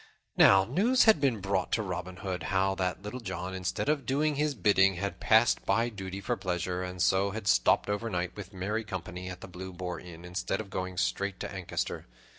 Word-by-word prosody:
Now 95 0 +7
news 210 - +3
had 220 -10 +5
been 125 -7 +1
brought 95 -1 -1
to 110 - +2
Robin 90 -1 -5
Hood 95 -2 -2
how 95 0 +2
that 95 0 -2
Little 105 +5 -5
John, 95 -4 -5
instead 95 +6 -2
of 150 -1 +1
doing 150 +3 +2
his 145 0 0
bidding, 95 -4 +4
had 100 +2 -4
passed 110 +1 +4
by 115 +1 +2
duty 95 -3 -6
for 120 +5 -1
pleasure, 90 -2 -2
and 90 0 -5
so 95 +3 +3
had 110 +1 -6
stopped 90 - +4
overnight 105 -4 -2
with 100 -2 -8
merry 105 +4 -2
company 90 -2 -6
at 90 0 -8
the - - -8
Blue 95 +1 -8
Boar 90 0 -5
Inn, 85 -1 -11
instead 90 +2 -2
of 105 -3 -7
going 95 -1 -4
straight 100 0 -1
to - - -4
Ancaster. 95 -2 -4
95 Hz, 205 wpm, -29 LUFS, 90-110 Hz, -, Now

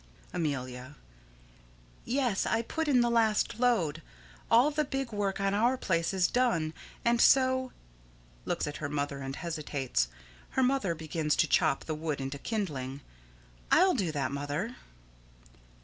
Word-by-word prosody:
Amelia: 130 -5 -3 1.1
Yes. 245 -6 0
I 225 +1 +1
put 320 +6 -3
in 260 -4 +4
the 240 - +2
last 225 -1 +2
load. 180 -11 +2 0.5
All 245 +6 +5
the 305 +1 +1
big 270 -3 -3
work 200 -2 -1
on 195 0 +1
our 235 +5 +2
place 170 -7 0
is 185 -2 +2
done, 225 -11 +1 0.3
and 235 0 +3
so 260 -1 +4 0.7
[Looks - - -1
at 150 - -5
her 145 - -4
mother 145 -1 -2
and 135 0 -5
hesitates. 145 - -2 0.5
Her 260 - +4
mother 250 -10 +1
begins 155 -1 -1
to - - +3
chop 135 - +2
the 160 - -2
wood 155 -2 -3
into 135 +1 -4
kindling.] 140 - -3 0.7
I'll 370 +2 +6
do 190 -9 0
that, 140 -3 -2
Mother. 145 - -3
180 Hz, 145 wpm, -30 LUFS, 145-240 Hz, 1.1 s, I'll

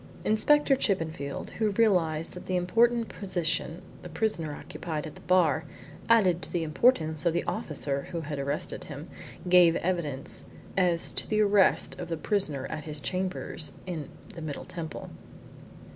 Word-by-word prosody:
Inspector 275 +6 +4
Chippenfield, 160 - -2
who 220 -1 +3
realised 175 -8 +2
that 180 - -10
the 185 - 0
important 230 +6 +3
position 175 -2 -2 0.2
the 180 - -9
prisoner 165 -4 -1
occupied 155 -1 -5
at 155 - -7
the - - -14
bar 165 -4 +3 0.5
added 190 -7 +5
to - - -9
the 175 -2 0
importance 160 - +2
of 170 -2 +2
the 170 - 0
officer 140 -2 -3
who 170 -2 -3
had 145 -2 -4
arrested 140 +2 -3
him, 150 +2 -8 0.4
gave 175 -2 +7
evidence 165 -7 -1 0.3
as 175 -3 +3
to - - -2
the 215 -1 +3
arrest 200 -2 +3
of 175 - -5
the 165 - -2
prisoner 155 -7 -1
at 155 - -5
his 150 -1 -2
chambers 185 -2 -2
in 160 -6 -5 0.2
the 165 - -8
Middle 155 -3 -5
Temple. 165 -3 -7
170 Hz, 155 wpm, -28 LUFS, 155-190 Hz, 0.5 s, gave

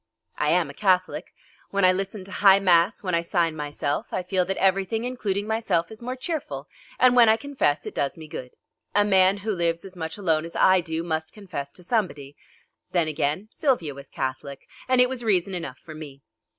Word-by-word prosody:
I 150 - +1
am 170 0 +3
a - - -14
Catholic. 185 +1 +1 0.4
When 200 -1 +2
I 185 - +7
listen 195 +1 -3
to 195 - -12
high 195 0 +6
mass, 185 +1 +3
when 185 -2 -2
I 170 - +3
sign 170 -1 0
myself, 145 -1 -3
I 185 - -2
feel 185 0 +1
that 195 +1 -2
everything, 195 +3 +1
including 210 -5 -2
myself, 210 -6 0
is 220 - -11
more 250 +2 -4
cheerful, 255 - -4 0.3
and 250 -1 +5
when 235 -2 +7
I 220 - +5
confess, 270 - 0
it - - -6
does 140 +2 -2
me 160 -1 -10
good. 125 -4 -7 0.5
A 205 0 +5
man 190 -1 +4
who 210 +2 -3
lives 170 -1 -1
as 190 -1 -10
much 160 -2 -5
alone 165 -6 +1
as 165 - -9
I 185 -1 +5
do, 160 0 -3
must 160 -1 -3
confess 170 -9 -6
to 180 - -13
somebody. 170 - -2 0.6
Then, 170 -3 +2
again, 155 +5 -1
Sylvia 245 - 0
was 140 0 -12
Catholic, 130 +1 -5 0.2
and 255 -1 +3
it 250 - +6
was 250 -1 -4
reason 195 -3 +1
enough 170 -8 -5
for 160 - -12
me. 145 -3 -10
185 Hz, 205 wpm, -25 LUFS, 160-205 Hz, 0.6 s, I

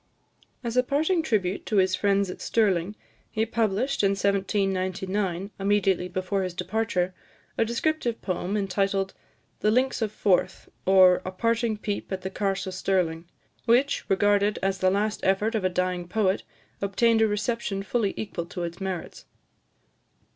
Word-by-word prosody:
As 235 -1 -3
a 250 - +6
parting 310 +7 +1
tribute 205 - 0
to 215 - -1
his 190 -1 +3
friends 200 0 +1
at - - -10
Stirling, 200 -3 +1 0.3
he 220 0 0
published, 230 +4 0
in 200 -1 +3
1799, 195 -1 -1
immediately 195 -2 +2
before 185 +2 -2
his 185 -2 -3
departure, 185 -1 -1 0.4
a - - +2
descriptive 235 +1 -1
poem, 185 +2 -2
entitled 195 -1 0 0.5
"The 210 - +2
Links 255 +3 +1
of 220 -2 0
Forth, 195 -3 0 0.2
or 185 -1 +6
a - - -4
Parting 230 +2 0
Peep 205 -1 -4
at 190 -1 -3
the 190 - -4
Carse 195 -1 -1
of 190 - -5
Stirling," 180 -3 0 0.4
which, 250 +4 +3
regarded 205 +1 +3
as 195 -1 0
the 185 - +3
last 205 +2 0
effort 200 +4 +1
of 220 -3 -1
a 185 - +2
dying 180 -1 -1
poet, 195 0 +1 0.4
obtained 225 +3 +2
a 220 - +5
reception 210 -1 -2
fully 205 0 0
equal 175 -5 -4
to 175 0 -5
its 170 +2 -6
merits. 190 -3 -5
195 Hz, 155 wpm, -26 LUFS, 185-220 Hz, 0.5 s, a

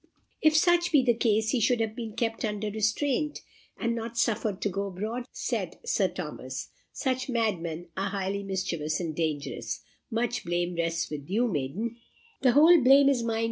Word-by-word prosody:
"If 310 0 +5
such 345 +1 +4
be 290 -4 +5
the 240 - +5
case, 220 -1 +1
he 255 - +2
should 240 +2 +2
have 220 -1 -1
been 225 -3 -6
kept 225 -1 -1
under 210 -1 -2
restraint, 255 +8 0 0.4
and 235 0 0
not 230 0 -5
suffered 220 -3 0
to 205 - +1
go 200 +1 -2
abroad," 215 +6 -4
said - - -3
Sir 470 - +2
Thomas. - - -6 0.2
"Such 260 0 -2
madmen 175 -8 -1
are 195 +1 -1
highly 195 0 -2
mischievous 170 -6 -2
and 165 -4 -3
dangerous. 155 -3 -3 0.3
Much 240 0 -1
blame 175 +1 -1
rests 165 -1 -1
with 145 0 -6
you, 230 +6 +2
maiden." 195 - -3 0.4
"The 255 -3 +4
whole 320 +4 +7
blame 275 +2 +7
is 265 -4 +2
mine!" 225 -1 -1
220 Hz, 175 wpm, -28 LUFS, 185-245 Hz, 0.4 s, whole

